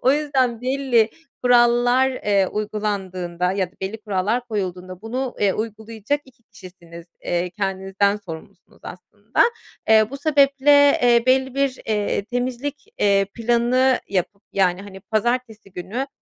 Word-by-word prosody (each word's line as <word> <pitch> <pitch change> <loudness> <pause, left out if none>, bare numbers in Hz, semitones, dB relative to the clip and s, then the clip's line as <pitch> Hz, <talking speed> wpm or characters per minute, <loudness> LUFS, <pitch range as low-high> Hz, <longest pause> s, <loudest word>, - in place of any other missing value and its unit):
O 260 - +4
yüzden 265 -6 0
belli 255 -4 +1 0.3
kurallar, 245 +1 +4
eee, 205 -6 +1
uygulandığında 190 -4 -3
ya 190 -2 -1
da - - -34
belli 195 +4 -4
kurallar 210 +4 -1
koyulduğunda 185 -3 -4
bunu, 250 +3 -4
eee, 200 -2 +3
uygulayacak 220 +5 -4
2 255 -2 -22
kişisiniz. 170 -4 -14 0.2
Eee, 175 +1 -1
kendinizden 195 +1 -1
sorumlusunuz 165 -6 -12
aslında. - - -2 0.5
Eee, 220 +1 +5
bu 275 - -6
sebeple, 285 -1 +4
eee, 240 -1 +5
belli 260 0 +2
bir, 275 -2 0
eee, 210 -2 -1
temizlik, 250 +4 -4
eee, 200 -1 +3
planı 240 +3 +2
yapıp 200 +1 -2
yani, 185 -1 +1
hani, 195 -1 -11
pazartesi 220 -1 -2
günü, 220 +10 -4
220 Hz, 130 wpm, -21 LUFS, 195-255 Hz, 0.5 s, Eee